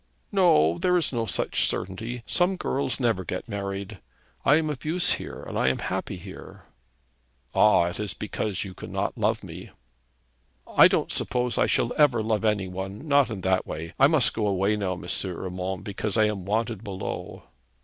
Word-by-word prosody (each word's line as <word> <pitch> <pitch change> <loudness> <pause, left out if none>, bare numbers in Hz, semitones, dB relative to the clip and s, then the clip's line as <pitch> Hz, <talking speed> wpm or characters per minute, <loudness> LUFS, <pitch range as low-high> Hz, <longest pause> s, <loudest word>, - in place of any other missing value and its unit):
'No; 85 - +4
there 180 0 +3
is 160 -5 0
no 115 -2 -1
such - - +1
certainty. 115 +6 -4
Some 180 +2 +2
girls 135 -8 -1
never 115 -7 +1
get 90 +4 -5
married. 100 -1 -5 0.4
I 145 - +5
am 155 -1 +1
of 135 - -7
use 175 +4 +2
here, - - -3
and - - -4
I - - +2
am 65 - +2
happy - - -3
here.' - - -11 0.9
'Ah! 105 -4 +5
it 90 +3 -4
is 105 -3 -3
because 100 -4 -3
you 95 -2 -8
cannot - - -3
love - - 0
me.' - - -9 1.0
'I - - +7
don't - - 0
suppose 125 -1 0
I - - +4
shall 120 - +1
ever 130 -7 +4
love 110 -1 0
any 105 -3 +1
one, 95 +8 -6
not 140 -2 +4
in 105 -4 -5
that 95 0 +1
way. 80 +1 -6
I 135 - +8
must 150 -6 +3
go 110 -2 0
away 100 +1 +1
now, 100 -3 -1
M. 90 - -8 0.2
Urmand, 90 0 -4
because 100 +2 -3
I 110 - +5
am 105 -4 -2
wanted 110 +1 -1
below.' 95 -3 -6
105 Hz, 180 wpm, -26 LUFS, 95-125 Hz, 1.0 s, I